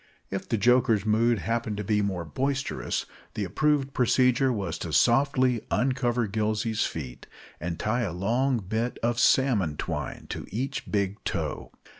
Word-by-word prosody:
If 95 0 -4
the 115 - +1
joker's 115 -1 +3
mood 115 +2 +3
happened 115 -1 -2
to 105 - -3
be 105 +1 +1
more 95 -4 -2
boisterous, 135 - -2 0.3
the 105 - -1
approved 140 - +1
procedure 125 +1 +3
was 95 -7 -3
to 85 - -5
softly 125 - +3
uncover 125 -2 +1
Gillsey's 110 +1 0
feet, 65 -6 -7 0.3
and 85 0 -4
tie 120 +7 0
a 105 -7 -1
long 120 +9 +1
bit 115 +4 -1
of 120 0 +1
salmon 105 - +3
twine - - -4
to - - -6
each 130 +6 -4
big 100 0 -1
toe. - - -3
115 Hz, 150 wpm, -27 LUFS, 100-125 Hz, 0.3 s, joker's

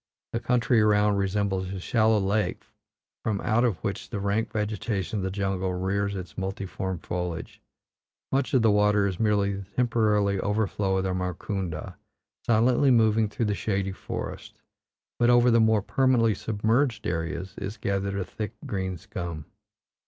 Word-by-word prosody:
The 115 - 0
country 120 0 +2
around 105 -1 +3
resembles 95 -1 -1
a 95 - -4
shallow 110 +3 +2
lake 100 -1 0 0.6
from 105 -3 0
out 115 +2 +2
of 115 -8 +1
which 100 - -3
the 105 - -3
rank 100 +3 0
vegetation 105 -1 -2
of - - -3
the 95 - -1
jungle 95 -1 -1
rears 100 +2 -1
its 90 -1 -6
multiform 95 -1 -3
foliage; 85 0 -5 0.7
much 135 +1 +1
of 125 - +4
the 110 - +5
water 105 0 +3
is 95 -3 -2
merely 105 -2 +2
the 100 -1 -7
temporary 105 -5 +2
overflow 100 -2 0
of 95 - 0
the 95 -1 -1
Markunda, 90 -2 -4 0.5
silently 120 +4 +4
moving 110 -3 +4
through 115 +2 -2
the 105 - +1
shady 95 0 -1
forest, 95 - -7 0.6
but 120 0 +4
over 120 0 +5
the 115 - +5
more 110 -2 +3
permanently 125 -4 +3
submerged 115 +5 0
areas 85 +2 -3
is 100 +2 -5
gathered 100 0 -1
a 95 - -2
thick 105 -3 -5
green 95 -3 -3
scum. 85 -2 -6
100 Hz, 155 wpm, -26 LUFS, 95-110 Hz, 0.7 s, the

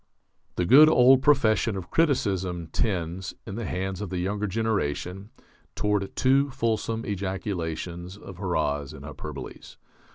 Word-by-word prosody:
The 90 - 0
good 145 - +8
old 130 -2 +6
profession 115 -8 +3
of 90 -2 -8
criticism 95 - 0
tends, 90 -3 -2
in - - -7
the 115 +2 -4
hands 95 +1 -3
of 105 - -4
the 90 - -3
younger 100 +4 -1
generation, 100 -2 -2 0.5
toward 105 -2 -1
too 135 +2 +3
fulsome 115 -2 -1
ejaculations 90 -2 -4
of 95 -3 -11
hurrahs 75 -6 -1
and 70 -2 -10
hyperboles. 75 -3 -9
95 Hz, 130 wpm, -26 LUFS, 90-115 Hz, 0.5 s, good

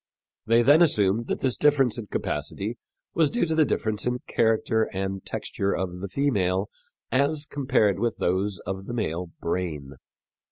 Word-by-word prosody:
They 115 +1 +4
then 145 +6 +6
assumed 110 - +3
that - - -2
this 130 -4 +2
difference 135 -3 +3
in 110 - -7
capacity 100 +9 -3 0.3
was 160 -3 +3
due 240 - 0
to 160 - -1
the 160 -1 +4
difference 110 -4 -1
in 125 0 0
character 110 -1 +1
and 95 0 -3
texture 100 0 -2
of 90 -1 -3
the 100 - -4
female 100 -5 0 0.4
as 145 +4 +1
compared 130 -8 +1
with 120 -2 -1
those 95 +1 0
of 95 +1 -5
the 120 - -5
male 90 -5 -2
brain. 80 -6 -3
110 Hz, 160 wpm, -25 LUFS, 95-130 Hz, 0.4 s, then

